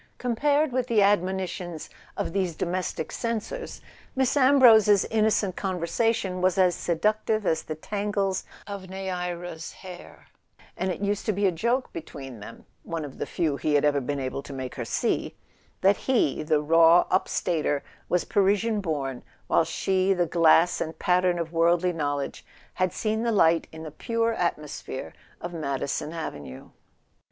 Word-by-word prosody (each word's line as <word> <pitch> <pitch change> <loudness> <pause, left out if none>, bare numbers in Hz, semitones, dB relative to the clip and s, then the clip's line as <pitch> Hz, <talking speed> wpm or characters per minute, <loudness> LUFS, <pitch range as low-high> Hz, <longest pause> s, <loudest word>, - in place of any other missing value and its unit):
Compared 285 +5 +1
with 250 0 -1
the 220 -4 +4
admonitions 185 -4 -1 0.3
of - - -3
these 185 -4 -1
domestic 175 -2 -3
censors, 230 - -4 0.3
Miss 265 0 +1
Ambrose's 240 -7 +6
innocent 215 -3 +2
conversation 185 +1 -1
was 185 0 +2
as 185 -2 +4
seductive 215 +5 0
as 160 - +1
the 155 - -6
tangles 200 +2 -2 0.2
of 200 -2 -7
Neaera's 180 -3 -5
hair, 180 -2 -12 0.5
and 190 - -2
it 180 - -5
used 205 0 -1
to - - +3
be 200 0 0
a 190 - +4
joke 235 +10 -1
between 135 -7 -8
them 105 - -11 0.2
(one 165 -2 -4
of 140 - -11
the - - -3
few 155 -5 -1
he 150 0 0
had 145 - +3
ever 145 -1 +2
been 140 +2 -3
able 130 +1 -3
to 140 - -10
make 130 -1 -5
her 120 - -5
see) - - -1 0.5
that 195 +1 +4
he, 240 - +1
the 150 -1 +1
raw 165 +2 +6
up 185 - +2
Stater, 150 -5 -1 0.3
was 180 - +1
Parisian 205 +2 +2
born, 140 -7 -3 0.2
while - - +3
she, 190 +4 +1
the 175 -1 +2
glass 165 +1 +4
and 160 0 -4
pattern 180 0 +2
of 165 -1 -4
worldly 170 +2 +3
knowledge, 145 -3 -3 0.3
had 185 -1 0
seen 220 0 -1
the 235 0 0
light 165 -5 +3
in 160 0 -9
the 155 - -7
pure 230 - -1
at¬ 175 -4 0
mosphere 150 -3 -7 0.3
of 175 0 -6
Madison 140 -1 -3
Avenue. 75 - -7
180 Hz, 160 wpm, -26 LUFS, 160-205 Hz, 0.5 s, Ambrose's